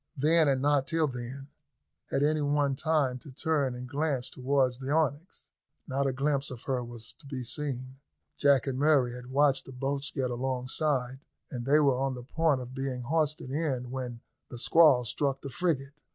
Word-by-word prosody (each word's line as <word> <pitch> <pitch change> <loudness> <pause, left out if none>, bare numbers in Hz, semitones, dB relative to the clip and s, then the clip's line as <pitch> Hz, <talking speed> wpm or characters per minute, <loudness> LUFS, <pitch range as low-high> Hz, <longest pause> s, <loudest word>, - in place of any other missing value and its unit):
Then, 155 +3 +4
and 135 -1 +1
not 145 -2 +3
till 165 -1 +2
then, 130 +1 -6 0.6
had 140 - +1
any 155 +1 +2
one 145 -1 +1
time 145 -4 +1
to 140 - -12
turn 140 -2 0
a 125 - -7
glance 135 -1 -2
towards 130 -1 +1
the 135 0 -5
Onyx. 155 +2 -1 0.4
Not 140 +1 0
a - - +1
glimpse 140 +1 0
of 125 -3 -8
her 130 -2 -1
was 120 -1 -10
to 150 - -15
be 130 -2 -4
seen. 130 0 -4 0.4
Jack 140 -3 +4
and 135 -2 -2
Murray 140 -5 +3
had 125 0 -9
watched 140 0 +3
the - - -8
boats 140 +2 -2
get 130 -3 -2
alongside, 130 +1 -1 0.3
and 120 -1 -5
they 145 +2 +5
were 135 -4 +3
on 135 -1 0
the 125 - -8
point 150 0 +1
of 125 +1 -8
being 130 -2 -3
hoisted 150 -1 0
in 135 -5 -2
when 125 -3 -5 0.3
the 120 - -7
squall 140 -1 +5
struck 135 +4 -1
the 140 - -6
frigate. 140 -3 -1
135 Hz, 185 wpm, -29 LUFS, 125-145 Hz, 0.6 s, they